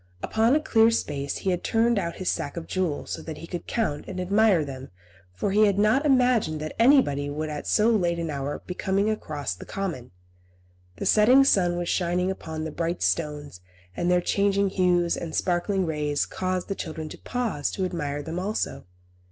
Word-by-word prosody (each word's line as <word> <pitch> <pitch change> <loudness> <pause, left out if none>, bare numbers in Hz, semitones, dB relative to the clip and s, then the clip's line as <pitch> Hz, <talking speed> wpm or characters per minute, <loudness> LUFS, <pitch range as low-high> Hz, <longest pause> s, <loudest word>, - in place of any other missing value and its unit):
Upon 225 +5 +2
a - - +4
clear 225 -7 +4
space 140 -11 -2
he 190 - -1
had 180 - -2
turned 230 -1 +2
out 170 -3 -3
his 185 - -6
sack 145 - -2
of 165 - -5
jewels, 180 -6 -2
so - - -4
that 160 -2 -7
he - - -8
could 175 0 -6
count 185 -11 -1
and 185 -1 -5
admire 195 -2 +3
them, 135 -1 -8 0.4
for 140 - -2
he 210 +2 +5
had 200 -1 +1
not 220 +9 +3
imagined 250 - +3
that 155 0 -5
anybody 230 - +4
would 155 +2 -3
at 150 -1 -6
so 220 +2 +3
late 175 -6 +1
an 165 -2 -3
hour 140 0 -4
be 180 - -5
coming 195 +3 0
across 150 - -4
the 90 - -10
common. 170 -11 -5 0.9
The - - -5
setting 245 +6 +6
sun 180 -9 +3
was 175 0 -3
shining 180 +1 0
upon 160 -4 -6
the 160 - -4
brilliant 170 +2 -2
stones, 150 - -2 0.3
and 175 - -1
their 180 0 +3
changing 200 +1 +1
hues 175 -2 +2
and 165 -2 -5
sparkling 185 +2 0
rays 150 -2 -1
caused 185 -1 -3
the 195 - -2
children 160 -4 -6
to - - -10
pause 230 - -2
to 190 - -2
admire 145 -5 -3
them 165 +4 -4
also. 205 +4 -3
180 Hz, 195 wpm, -25 LUFS, 155-205 Hz, 0.9 s, setting